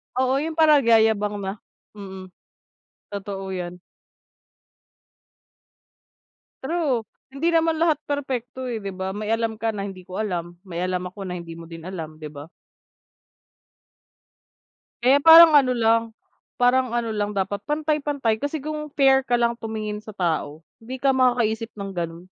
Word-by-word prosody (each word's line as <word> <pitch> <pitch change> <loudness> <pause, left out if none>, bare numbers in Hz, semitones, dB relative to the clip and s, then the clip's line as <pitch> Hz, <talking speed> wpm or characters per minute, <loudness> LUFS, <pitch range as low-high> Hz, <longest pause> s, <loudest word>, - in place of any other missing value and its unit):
Oo, 260 +1 +2
yun 320 +2 -3
pala 310 -2 +6
nagyayabang 220 -4 +3
na. 195 +2 -5 0.4
Mm, 190 -2 -9 0.8
totoo 195 -1 -5
'yan. 180 -1 -5 2.8
True, 275 -6 0 0.2
hindi 305 +6 -1
naman 325 -1 +2
lahat 315 -2 +2
perpekto, 260 -2 -3
eh, 235 -3 -4
'di 200 - -4
ba? 190 0 -4
May 210 +1 -5
alam 225 -1 -1
ka 225 - +1
na 200 -2 -3
hindi 190 -2 -8
ko 185 +1 -9
alam, 175 -5 -3
may 175 -2 -5
alam 180 0 -2
ako 185 +3 -8
na 180 - -4
hindi 170 -1 -8
mo 165 0 -11
din 165 0 -10
alam, 160 -4 -7
'di 155 -1 -8
ba? 145 +3 -10 2.5
Kaya 270 +3 +5
parang 325 0 +10
ano 265 -4 +5
lang 225 0 +3 0.5
parang 250 +1 +3
ano 230 -1 -2
lang, 205 -1 -1
dapat 200 +1 -1
pantay-pantay 295 -6 0
kasi 290 +2 -2
kung 300 +1 -5
fair 270 -1 +5
ka 245 -2 0
lang 235 0 +2
tumingin 215 -1 -4
sa 215 - -13
tao, 160 -5 -2 0.2
hindi 255 +3 -7
ka 270 +1 +2
makakaisip 240 -3 +1
ng 195 -1 -6
ganun. 170 0 -5
225 Hz, 145 wpm, -23 LUFS, 190-265 Hz, 2.8 s, parang